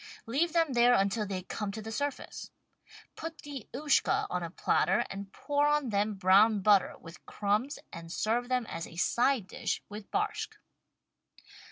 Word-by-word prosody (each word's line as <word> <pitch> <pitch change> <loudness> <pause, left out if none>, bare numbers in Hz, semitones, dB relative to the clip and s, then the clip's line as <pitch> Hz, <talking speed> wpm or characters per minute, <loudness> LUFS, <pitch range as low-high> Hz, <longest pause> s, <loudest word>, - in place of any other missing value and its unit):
Leave 285 +9 +1
them 330 -5 +2
there 245 0 +5
until 200 +1 +1
they 185 -2 -4
come 205 +2 -4
to 215 - -6
the 220 +1 -6
surface. 285 +4 -4 0.7
Put 325 -1 -7
the 280 -6 -8
Ushka 285 +3 +2
on 180 - -1
a 170 - -4
platter 190 +2 +1
and 195 0 -7
pour 290 +4 0
on 295 -3 +2
them 205 0 0
brown 200 +3 +5
butter 200 -1 +4
with 170 +1 -13
crumbs 210 +7 0 0.2
and 165 0 -8
serve 235 +6 0
them 250 -2 +1
as 165 -5 -5
a - - -13
side 240 +5 +2
dish - - -3
with 205 0 -9
barshck. 425 +1 -2
220 Hz, 165 wpm, -30 LUFS, 195-275 Hz, 0.7 s, there